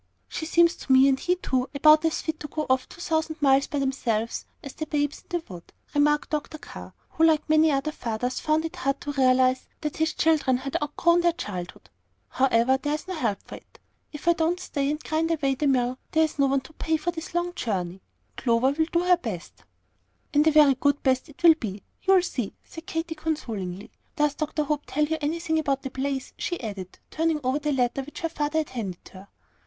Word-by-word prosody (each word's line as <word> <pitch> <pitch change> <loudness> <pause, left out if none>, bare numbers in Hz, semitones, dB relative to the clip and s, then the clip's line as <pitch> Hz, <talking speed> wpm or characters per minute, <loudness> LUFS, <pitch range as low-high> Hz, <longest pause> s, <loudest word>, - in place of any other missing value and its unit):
"She 315 - -5
seems 340 0 +4
to - - -5
me, 265 +1 +7
and 270 -1 +2
he 360 - +1
too, 260 -8 -1
about 305 +2 +6
as 325 - 0
fit 315 -1 -3
to 295 - -6
go 310 +1 -3
off 260 0 +1
two - - -13
thousand 320 -1 -1
miles 275 -1 +4
by 290 - -3
themselves 240 -5 -1 0.2
as 275 -3 -8
the 310 - -5
Babes 290 -1 -1
in - - -34
the 345 -2 -2
Wood," 175 -3 -11 0.2
remarked 295 +1 +2
Dr. 305 +1 -3
Carr, - - -11
who, 325 - -1
like 315 -2 +4
many 310 0 +5
other 280 +2 0
fathers, 245 -1 -3
found 310 +1 +1
it 325 - -6
hard 275 +1 -1
to 290 - -4
realize 255 -1 +3
that 300 -2 -4
his 320 0 0
children 300 -5 +2
had 275 +1 -6
outgrown 340 +4 +2
their 345 -1 +3
childhood. 180 - -7 0.4
"However, 260 0 +3
there's 300 +4 -2
no 375 - -4
help 230 - -2
for - - -9
it. - - -20 0.3
If 295 +2 -9
I 340 - +7
don't 335 +2 0
stay 280 -6 -2
and 300 +1 -3
grind 320 +1 0
away 295 -5 +1
at 265 - -3
the 295 - +1
mill, 255 -1 +1
there 320 - +4
is 310 -2 -2
no 275 - +4
one 270 0 +1
to 315 - -15
pay 320 +1 0
for 350 +3 -2
this 330 0 -8
long 350 0 0
journey. 190 - -3 0.4
Clover 240 +2 +2
will - - -2
have 320 - +3
to - - -20
do - - 0
her 360 0 +5
best." 215 - -7 0.7
"And 300 +2 +4
a - - +6
very 300 -2 +6
good 285 +2 0
best 260 +3 +1
it 295 - -17
will 335 -1 +9
be 210 - -6 0.2
you'll 380 -2 +4
see," 245 - -3
said 325 0 -11
Katy, 325 0 -3
consolingly. 225 - -4 0.2
"Does 300 -3 +2
Dr. 305 0 -2
Hope 295 0 -2
tell 300 +1 +1
you 320 +1 -2
anything 320 +2 0
about 275 -3 -1
the 270 - -5
place?" 270 0 -3
she 350 - -3
added, 200 -5 -7
turning 320 -1 0
over 260 +3 +1
the 300 0 -1
letter 255 0 +1
which 290 +3 -10
her 330 - -1
father 300 0 -2
had 310 -1 0
handed 205 -8 -6
her. 190 +1 -13
295 Hz, 225 wpm, -26 LUFS, 260-320 Hz, 0.7 s, will